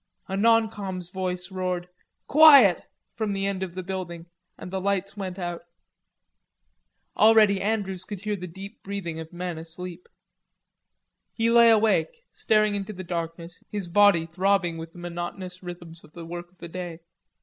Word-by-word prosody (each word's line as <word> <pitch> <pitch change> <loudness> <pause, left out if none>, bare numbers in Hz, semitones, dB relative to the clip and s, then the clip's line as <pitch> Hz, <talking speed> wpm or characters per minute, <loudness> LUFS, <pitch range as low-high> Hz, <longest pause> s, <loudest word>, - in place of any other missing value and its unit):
A 195 - -3
non 225 +2 +4
com's 190 -5 -6
voice 185 -1 -4
roared: 180 -1 -3 0.4
"Quiet," 280 - +7 0.3
from 215 -3 -2
the 195 0 -2
end 195 -1 -2
of 180 -2 -5
the 185 - -4
building, 175 -3 -5 0.3
and 180 - -9
the 190 0 -2
lights 195 0 -1
went 190 -2 -5
out. 175 -2 -4 1.5
Already 215 -3 +5
Andrews 195 -3 -1
could 205 -2 -7
hear 210 0 -2
the 180 -2 -7
deep 195 +4 -10
breathing 190 -5 -5
of 160 0 -8
men 175 -2 -5
asleep. 175 +2 -8 1.3
He 230 0 +2
lay 235 0 +7
awake, 225 - +2
staring 215 -1 +2
into 200 +1 -4
the 185 -1 -7
darkness, 170 0 -5
his 205 -4 -3
body 200 -2 +5
throbbing 180 0 0
with 165 0 -8
the - - -15
monotonous 175 +1 -6
rhythms 175 -2 -9
of 155 - -18
the 170 -1 -9
work 175 +1 -7
of 185 - -31
the 170 - -9
day. 175 -1 -6
185 Hz, 160 wpm, -25 LUFS, 175-200 Hz, 1.5 s, Quiet